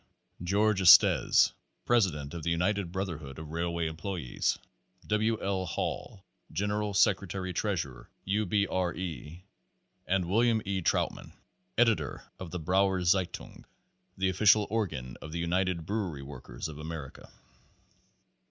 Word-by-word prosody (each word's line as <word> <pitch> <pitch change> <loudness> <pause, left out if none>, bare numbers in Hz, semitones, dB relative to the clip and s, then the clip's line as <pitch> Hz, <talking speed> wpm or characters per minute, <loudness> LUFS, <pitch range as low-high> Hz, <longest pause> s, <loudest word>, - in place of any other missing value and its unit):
George 100 +3 +2
Estes, 90 - +7 0.3
president 85 -12 +1
of 85 - -5
the 85 - -2
United 90 +2 0
Brotherhood 80 -8 -5
of 80 -1 -8
Railway 85 0 -1
Employes, 80 -3 -2 0.5
W. 110 +5 +1
L. 95 -2 -1
Hall, 95 +3 -4 0.3
general 105 +3 -1
secretary 95 -1 +1
treasurer 85 - -3 0.2
U. 100 +2 0
B. 100 +2 +2
R. 90 -2 -1
E., 85 0 -6 0.6
and 95 -1 +1
Wm. 115 +5 +3
E. 95 -1 -1
Trautmann, - - -1 0.4
editor 115 -2 +2 0.2
of 95 - -6
the 90 - -4
"Brauer 95 +2 +2
Zeitung," 90 0 -1 0.5
the 95 0 +1
official 105 +2 +5
organ 80 - -2
of 75 - -8
the 85 - -2
United 85 0 0
Brewery 95 -8 -3
Workers 65 0 -7
of 75 -1 -9
America. 80 -3 -7
90 Hz, 125 wpm, -30 LUFS, 80-100 Hz, 0.6 s, Estes